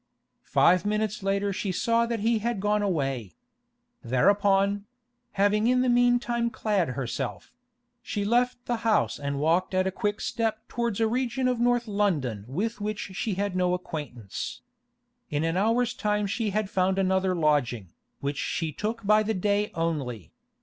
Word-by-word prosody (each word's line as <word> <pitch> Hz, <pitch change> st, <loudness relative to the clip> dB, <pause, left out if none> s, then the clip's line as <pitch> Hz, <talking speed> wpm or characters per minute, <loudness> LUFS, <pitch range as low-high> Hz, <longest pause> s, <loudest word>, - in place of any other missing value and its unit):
Five 180 Hz, 0 st, +4 dB
minutes 210 Hz, 0 st, -1 dB
later 195 Hz, +1 st, 0 dB
she 190 Hz, 0 st, -2 dB
saw 230 Hz, +5 st, +1 dB
that 230 Hz, -2 st, -2 dB
he 225 Hz, +1 st, +2 dB
had 235 Hz, -1 st, -2 dB
gone 210 Hz, +1 st, +1 dB
away. 135 Hz, -, -2 dB, 0.7 s
Thereupon—having 205 Hz, -, +1 dB
in 250 Hz, +1 st, +3 dB
the 255 Hz, -, +2 dB
meantime 240 Hz, -1 st, +2 dB
clad 210 Hz, -6 st, 0 dB
herself—she 240 Hz, -, -6 dB
left 245 Hz, +2 st, +1 dB
the 240 Hz, -, -1 dB
house 225 Hz, -1 st, +1 dB
and 140 Hz, -1 st, -3 dB
walked 170 Hz, +6 st, +1 dB
at 185 Hz, 0 st, +2 dB
a 190 Hz, -, 0 dB
quick 205 Hz, +1 st, -2 dB
step 225 Hz, -1 st, -2 dB
towards 235 Hz, -3 st, -2 dB
a 225 Hz, -, +3 dB
region 255 Hz, +2 st, 0 dB
of 250 Hz, -2 st, 0 dB
North 240 Hz, 0 st, +2 dB
London 155 Hz, -, 0 dB
with 210 Hz, -, -3 dB
which 210 Hz, -1 st, -3 dB
she 200 Hz, +1 st, -2 dB
had 200 Hz, -1 st, -2 dB
no 180 Hz, -1 st, +2 dB
acquaintance. 145 Hz, -, -6 dB, 0.7 s
In 145 Hz, +1 st, -1 dB
an 165 Hz, +1 st, 0 dB
hour's 230 Hz, +5 st, +2 dB
time 210 Hz, 0 st, 0 dB
she 210 Hz, +2 st, -1 dB
had 210 Hz, +1 st, -1 dB
found 190 Hz, 0 st, +1 dB
another 190 Hz, -1 st, +2 dB
lodging, 125 Hz, -, 0 dB, 0.3 s
which 140 Hz, +1 st, -2 dB
she 165 Hz, -2 st, -2 dB
took 215 Hz, +8 st, -4 dB
by 215 Hz, +1 st, +5 dB
the 215 Hz, +1 st, -1 dB
day 205 Hz, +2 st, +1 dB
only. 140 Hz, -, -3 dB
205 Hz, 155 wpm, -27 LUFS, 180-230 Hz, 0.7 s, by